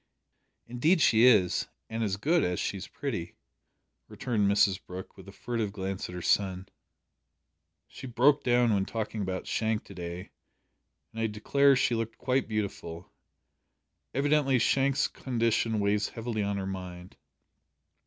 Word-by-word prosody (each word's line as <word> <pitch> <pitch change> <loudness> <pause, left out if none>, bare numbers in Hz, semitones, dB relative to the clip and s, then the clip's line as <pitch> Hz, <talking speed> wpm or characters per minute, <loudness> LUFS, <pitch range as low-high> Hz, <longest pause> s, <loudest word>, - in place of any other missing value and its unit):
"Indeed 150 +10 +2
she 115 -5 +5
is 105 -8 +4 0.2
and 115 0 -3
as 100 -2 -1
good 160 - +2
as 90 0 -1
she's 95 -2 -3
pretty," 110 -12 -5 0.7
returned 105 -5 -1
Mrs 100 -2 +2
Brooke, 90 +1 -9
with - - -14
a - - -9
furtive 110 +1 -3
glance 95 -2 -4
at 90 - -8
her 90 - -6
son. 95 -1 +1 1.2
"She 130 +2 -10
broke 135 +4 +3
down 120 -2 +3
when 100 -1 +2
talking 110 0 -4
about 95 -1 -3
Shank 110 -1 -1
to - - -13
day, 90 +1 -7 0.8
and 115 - -5
I 115 - +2
declare 140 +6 +3
she 125 -1 +1
looked 115 0 -3
quite 130 +1 0
beautiful! 100 -6 -5 1.0
Evidently 140 -1 +2
Shank's 135 +3 +2
condition 115 -3 0
weighs 100 0 +1
heavily 115 -1 -4
on 100 0 -1
her 95 - -3
mind." 90 -2 -7
110 Hz, 145 wpm, -29 LUFS, 95-125 Hz, 1.2 s, she